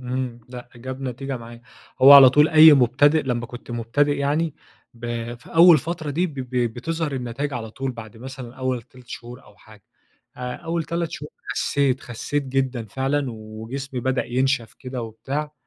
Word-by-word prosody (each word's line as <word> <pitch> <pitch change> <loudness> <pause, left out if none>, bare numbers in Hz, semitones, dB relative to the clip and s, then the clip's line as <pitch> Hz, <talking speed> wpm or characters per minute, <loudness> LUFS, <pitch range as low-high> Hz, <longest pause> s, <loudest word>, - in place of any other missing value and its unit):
إمم 125 -1 -4
لأ، 125 -1 -9
جاب 130 +2 -7
نتيجة 135 +1 -4
معايا، 120 0 -11 0.4
هو 140 +2 +10
على 135 -2 +10
طول 150 +3 +5
أي 155 0 +9
مُبتدئ 145 +5 +3
لمّا 120 -3 -2
كنت 120 0 -11
مبتدئ 125 +5 0
يعني 145 +2 0 0.4
ب 120 0 -5
في 120 +7 -15
أول 170 -1 +8
فترة 160 0 -4
دي 175 +6 0
ب 155 - -10
ب 130 -2 -6 0.2
بتظهر 160 +3 -3
النتايج 130 +3 -4
على 115 -3 -5
طول 135 +2 -4
بعد 110 -2 -11
مثلًا 130 0 -9
أول 130 -2 -2
3 125 +2 -19
شهور 120 +1 -9
أو 105 - -20
حاجة، 110 -2 -18 0.5
آآ، 125 0 -5
أول 165 -1 -3
3 170 0 -3
شهور 150 -2 -8 0.2
خسيت، 140 -3 0
خسيت 140 +5 -3
جدًا 130 -3 -1
فعلًا 135 +5 -1
وجسمي 110 +5 -7
بدأ 130 +1 0
ينشف 130 -2 -1
كده 125 -2 -6
وبتاع، 140 +7 -5
130 Hz, 170 wpm, -23 LUFS, 120-145 Hz, 0.5 s, هو